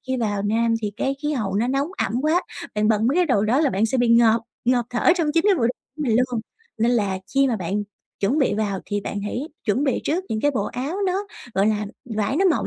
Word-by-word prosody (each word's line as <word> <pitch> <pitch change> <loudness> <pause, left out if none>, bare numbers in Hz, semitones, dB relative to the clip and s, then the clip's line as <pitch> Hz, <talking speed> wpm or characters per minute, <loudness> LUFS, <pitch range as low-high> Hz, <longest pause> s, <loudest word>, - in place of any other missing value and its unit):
khi 260 - -1
vào 205 -4 -1
Nam 230 +2 +1
thì 205 -1 -2
cái 270 - 0
khí 300 +1 0
hậu 205 -8 -2
nó 230 +4 +1
nóng 275 +3 0 0.2
ẩm - - -3
quá, 325 +4 +2 0.3
bạn 210 0 +2
bận 220 0 +2
mấy 270 - +2
cái 360 -1 +3
đồ 230 -9 +2
đó 250 +7 +2
là 290 -5 +3
bạn 205 +4 +1
sẽ 255 +3 -1
bị 240 -1 +2
ngợp 230 -1 +5 0.2
ngợp 245 -1 +2
thở 245 +8 +4
trong 335 -3 +1
chính 330 - +4
cái 400 - +5
bộ 315 - -2
đồ - - +2 0.3
của 305 - -3
mình 235 -6 +2
luôn. 250 -2 +1 0.4
Nên 230 +2 +3
là 200 -5 +1 0.2
khi 275 0 +4
mà 230 - 0
bạn 195 +3 -2 0.4
chuẩn 220 +10 +1
bị 275 - +2
vào 205 -3 -1
thì 205 -1 -1
bạn 205 0 -4
hãy 210 +4 -3 0.2
chuẩn 235 +7 +1
bị 270 - +1
trước 355 +5 0
những 220 - -2
cái 290 - +3
bộ 225 -8 -1
áo 275 - -4
nó, 385 +3 -1 0.3
gọi 195 +1 +3
là, 210 -1 0 0.3
vải 220 +7 0
nó 385 - +2
mỏng 345 -5 +2
235 Hz, 265 wpm, -23 LUFS, 210-275 Hz, 0.4 s, ngợp